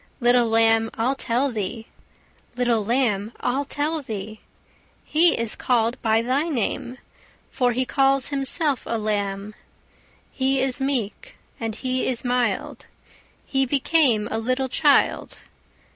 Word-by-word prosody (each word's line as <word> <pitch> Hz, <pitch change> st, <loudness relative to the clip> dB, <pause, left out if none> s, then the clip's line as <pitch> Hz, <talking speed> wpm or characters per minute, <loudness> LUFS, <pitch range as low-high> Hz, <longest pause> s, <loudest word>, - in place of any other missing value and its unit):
Little 245 Hz, -1 st, +4 dB
lamb, 225 Hz, 0 st, +3 dB
I'll 240 Hz, +4 st, 0 dB
tell 265 Hz, +1 st, 0 dB
thee; 220 Hz, +1 st, -4 dB, 0.7 s
Little 240 Hz, -3 st, +1 dB
lamb, 225 Hz, -2 st, 0 dB
I'll 265 Hz, +3 st, -1 dB
tell 300 Hz, +3 st, -2 dB
thee: 215 Hz, -3 st, -7 dB, 0.6 s
He 330 Hz, +2 st, +3 dB
is 230 Hz, -1 st, 0 dB
callèd 235 Hz, -2 st, +1 dB
by 225 Hz, 0 st, +2 dB
thy 275 Hz, +7 st, 0 dB
name, 245 Hz, -1 st, -2 dB, 0.5 s
For 245 Hz, -2 st, +1 dB
He 255 Hz, +2 st, 0 dB
calls 270 Hz, 0 st, +2 dB
Himself 280 Hz, 0 st, 0 dB
a 230 Hz, -, -1 dB
Lamb. 205 Hz, -1 st, -2 dB, 0.8 s
He 265 Hz, 0 st, 0 dB
is 260 Hz, 0 st, 0 dB
meek, 270 Hz, -, -3 dB, 0.2 s
and 225 Hz, -2 st, -3 dB
He 255 Hz, +1 st, -2 dB
is 255 Hz, -1 st, -1 dB
mild, 245 Hz, 0 st, -1 dB, 0.6 s
He 270 Hz, -1 st, +1 dB
became 270 Hz, -5 st, +2 dB
a 220 Hz, -, -1 dB
little 255 Hz, +3 st, -1 dB
child. 290 Hz, +2 st, +2 dB
245 Hz, 130 wpm, -23 LUFS, 225-270 Hz, 0.8 s, Little